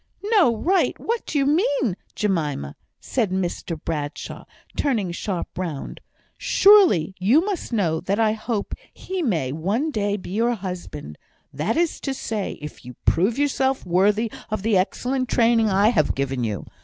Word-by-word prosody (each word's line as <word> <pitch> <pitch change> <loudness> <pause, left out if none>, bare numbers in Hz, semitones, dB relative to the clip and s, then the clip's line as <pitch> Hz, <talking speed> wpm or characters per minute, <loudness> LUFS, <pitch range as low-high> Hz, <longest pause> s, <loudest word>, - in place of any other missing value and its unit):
"No 355 - +5
right! 375 - +1
what 465 0 -2
do 300 - -1
you 275 - +3
mean, 285 - +2 0.2
Jemima?" 155 - -1 0.2
said 230 -6 -1
Mr 175 -3 -3
Bradshaw, 150 -2 -5 0.3
turning 220 -11 0
sharp 180 +1 -4
round. 165 -7 -5 0.4
"Surely 395 - +5
you 250 - +4
must 400 -9 -3
know 175 -8 +1
that 200 +5 -1
I 220 -1 +4
hope 220 -1 -3 0.2
he 375 -1 -5
may 165 - 0
one 200 - -1
day 205 -4 0
be 185 - -9
your 235 +4 +1
husband; 180 - -7 0.3
that 155 - -1
is 340 -1 +1
to 270 -1 -3
say, 215 -5 -3
if 150 - -8
you 125 0 -10
prove 195 +8 +2
yourself 270 -3 +1
worthy 205 +5 +2 0.2
of 215 -2 -3
the 220 -1 +2
excellent 250 +7 0
training 230 -2 +3
I 200 +2 +4
have 155 -11 +2
given 135 -2 -1
you. 105 -5 -3
210 Hz, 155 wpm, -23 LUFS, 175-265 Hz, 0.4 s, No